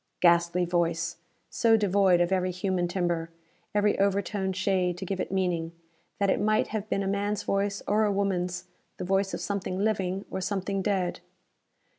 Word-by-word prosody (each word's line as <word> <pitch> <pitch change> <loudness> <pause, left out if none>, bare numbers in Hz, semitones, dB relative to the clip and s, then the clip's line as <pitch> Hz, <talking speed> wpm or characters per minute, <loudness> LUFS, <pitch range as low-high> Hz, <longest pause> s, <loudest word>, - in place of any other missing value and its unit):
Ghastly 170 0 +4
voice! 170 -1 0 0.3
So 230 -2 +4
devoid 195 -3 +3
of 175 +1 +1
every 185 -1 +1
human 180 -1 -1
timbre, 175 -2 -1 0.5
every 205 0 +2
overtone 200 0 +1
shade 185 -1 0
to 190 - -5
give 190 0 -3
it 180 - -3
meaning, 175 -3 -1 0.4
that 200 -1 +2
it - - 0
might 215 +1 +2
have 215 -1 -4
been 200 - 0
a - - -2
man's 200 +1 -1
voice, 200 0 -1
or 215 +1 +3
a 210 - +2
woman's, 180 -3 -1 0.3
the - - -4
voice 195 +1 +1
of - - -6
something 195 -2 -2
living, 195 -2 0
or 190 - -3
something 195 0 -1
dead. 190 -3 0
190 Hz, 170 wpm, -28 LUFS, 180-200 Hz, 0.5 s, Ghastly